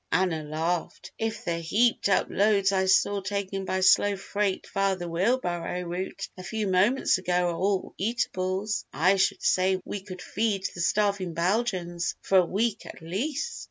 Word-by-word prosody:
Anna 180 -4 +1
laughed. 160 +3 -3
"If 225 -1 -3
the 170 -1 -1
heaped 215 +7 +2
up 195 - +3
loads 200 -1 +2
I 190 -1 +1
saw 200 +1 +3
taken 195 0 -3
by 190 0 -1
slow 205 +2 +5
freight 200 0 -2
via 195 -1 +2
the 175 -1 -6
wheel 185 +10 +2
barrow 175 -4 -3
route 185 +3 -4
a 185 - -9
few 215 +4 -3
moments 195 +4 +3
ago 180 -1 +1
are - - -4
all 195 +1 -1
eatables, 195 -1 -1
I 185 +5 +3
should 190 - +1
say 185 0 +2
we 205 - -5
could 185 -2 -9
feed 205 -3 -1
the 175 - -5
starving 200 -2 +1
Belgians 175 -2 -1
for 190 - +4
a 180 - +3
week, 215 +3 -1
at - - -11
least!" 270 - -3
190 Hz, 170 wpm, -27 LUFS, 180-205 Hz, -, slow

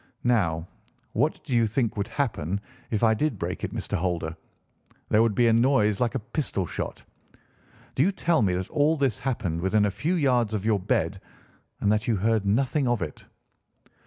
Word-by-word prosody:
Now, 90 -9 +1 0.5
what - - 0
do - - -5
you 115 -1 +4
think 115 +1 0
would 100 -2 -2
happen 100 - -2 0.3
if 110 0 -1
I 110 -1 +5
did 135 +1 -1
break - - -4
it, - - -2
Mr. - - -3
Holder? 85 -2 -2 0.7
There 105 - +4
would 115 -3 +2
be 120 - +4
a 115 - +5
noise 115 -4 +3
like 120 +2 +1
a - - +1
pistol 110 - -2
shot. - - -5 0.9
Do - - 0
you 185 +7 +4
tell 170 -5 +1
me 95 -4 +2
that 95 +1 -3
all 155 +2 +2
this 135 -4 0
happened 105 -11 -2
within 105 +3 +2
a 100 - +1
few 155 - -1
yards 125 -8 +2
of 105 -1 -3
your 110 -2 +2
bed 90 - -1 0.6
and 105 - +3
that 105 +2 0
you 115 - +2
heard 110 +1 +1
nothing 130 +6 +1
of 120 -2 +1
it?" - - -8
110 Hz, 190 wpm, -26 LUFS, 100-130 Hz, 0.9 s, I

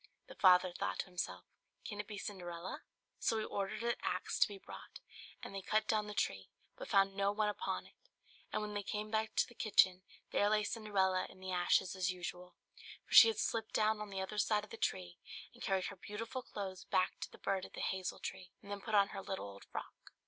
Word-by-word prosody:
The - - -11
father 180 -1 +6
thought 95 - -2
to - - -8
himself, 180 -1 -4 0.4
"Can 205 -2 -5
it 210 - -3
be 210 - -6
Cinderella?" 180 -3 -5 0.4
So 225 - +2
he 215 - -1
ordered 200 +3 -3
an 235 0 +2
axe - - -1
to - - +6
be 405 - -8
brought; 390 - -11 0.4
and - - -6
they 195 - -4
cut 215 +3 +1
down 215 -1 +2
the 210 - -6
tree, 95 - -1 0.3
but - - -7
found 195 0 +4
no 200 0 +2
one 210 0 +1
upon 210 - -2
it. - - -17 0.6
And - - -1
when 210 0 -4
they 205 - -1
came 210 +1 -4
back 220 0 +1
into - - +2
the - - -15
kitchen, 190 -5 +4 0.3
there 205 - +3
lay 210 0 +3
Cinderella 195 -4 +1
in - - -15
the 190 0 -5
ashes 180 +1 +2
as 185 -1 +1
usual; 180 0 -6 0.5
for - - -9
she 230 - +12
had 225 - +1
slipped 225 -1 -1
down 215 0 +3
on 210 - -5
the 195 -1 -3
other 210 +2 -3
side 210 0 +2
of 210 - -12
the - - -5
tree, 90 -1 -2 0.3
and - - -17
carried 190 -1 +1
her 200 - -5
beautiful 225 +6 -5
clothes 190 -5 -6
back 185 0 +1
to - - -4
the - - -13
bird 195 -1 -1
at - - -9
the - - -5
hazel 190 0 -1
tree, 180 -1 -6
and 200 - -10
then 200 0 -4
put 220 0 -1
on 200 -1 +5
her 195 - -5
little 190 - -4
old 100 0 -10
frock. - - -8
200 Hz, 230 wpm, -36 LUFS, 185-215 Hz, 0.6 s, she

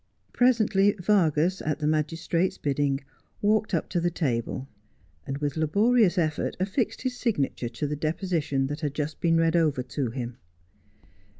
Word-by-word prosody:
Presently 215 -5 +3
Vargas, 180 -3 +2
at 150 -2 -1
the 150 - -3
magistrate's 165 +3 0
bidding, 140 -1 0 0.4
walked 215 +1 +2
up 165 - -1
to 175 - 0
the 175 +1 +1
table, 130 -5 -2 0.6
and, 135 - -3
with 145 -1 -2
laborious 200 +5 +3
effort, 155 -3 0
affixed 205 +7 -1
his 255 -1 -1
signature 145 - -1
to 120 +5 -4
the 150 +1 -2
deposition 155 -3 -1
that 145 +3 -4
had 145 -2 -2
just 150 0 -3
been 165 -1 +3
read 165 0 +2
over 150 -6 +2
to 130 0 -3
him. 120 0 -5
155 Hz, 155 wpm, -26 LUFS, 145-190 Hz, 0.6 s, Presently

